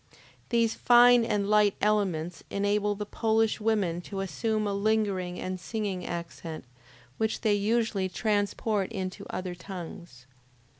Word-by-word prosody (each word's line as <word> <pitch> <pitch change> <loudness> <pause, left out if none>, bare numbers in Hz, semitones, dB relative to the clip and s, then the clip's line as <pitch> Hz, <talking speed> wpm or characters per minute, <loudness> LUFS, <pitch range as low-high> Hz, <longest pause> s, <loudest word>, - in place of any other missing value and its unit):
These 230 -2 +2
fine 245 0 +6
and 210 -3 0
light 210 -1 +4
elements 185 -6 0
enable 205 +1 0
the 210 +1 -4
Polish 220 +1 +1
women 200 -6 +1
to 195 +2 -5
assume 215 +5 -1
a 200 - -1
lingering 200 -3 0
and 185 0 -4
singing 195 -2 -3
accent, 170 -3 -6 0.5
which 220 0 0
they 215 -3 +3
usually 205 -2 +1
transport 205 0 0
into 185 -3 -5
other 185 -1 -4
tongues. 170 -7 -9
205 Hz, 130 wpm, -28 LUFS, 185-220 Hz, 0.5 s, fine